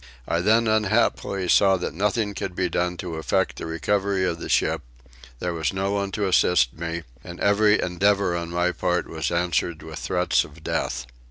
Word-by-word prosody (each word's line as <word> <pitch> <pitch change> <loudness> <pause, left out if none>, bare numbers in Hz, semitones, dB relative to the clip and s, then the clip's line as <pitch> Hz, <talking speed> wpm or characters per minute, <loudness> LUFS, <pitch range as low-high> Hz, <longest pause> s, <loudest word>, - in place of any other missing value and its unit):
I 85 - +1
then 110 +4 +3
unhappily 100 -3 +1
saw 95 +2 +5
that - - -4
nothing 105 +3 0
could 95 -2 -5
be - - 0
done 90 0 -1
to 85 -3 -5
effect 80 - 0
the - - -5
recovery 95 +4 0
of 85 -2 -2
the - - -6
ship: - - +2 0.6
there 90 +6 -3
was 80 -4 -1
no 95 +1 -1
one 100 -1 -1
to 105 -2 0
assist 90 -7 +3
me, 85 +1 -4 0.2
and 85 0 -9
every 105 +1 +4
endeavour 95 +1 +1
on 85 -1 -3
my 90 +1 +1
part 90 0 -1
was 80 -2 -3
answered 85 -1 -1
with 80 -1 -8
threats 90 +1 +1
of - - -14
death. 60 - -2
90 Hz, 185 wpm, -24 LUFS, 85-100 Hz, 0.6 s, saw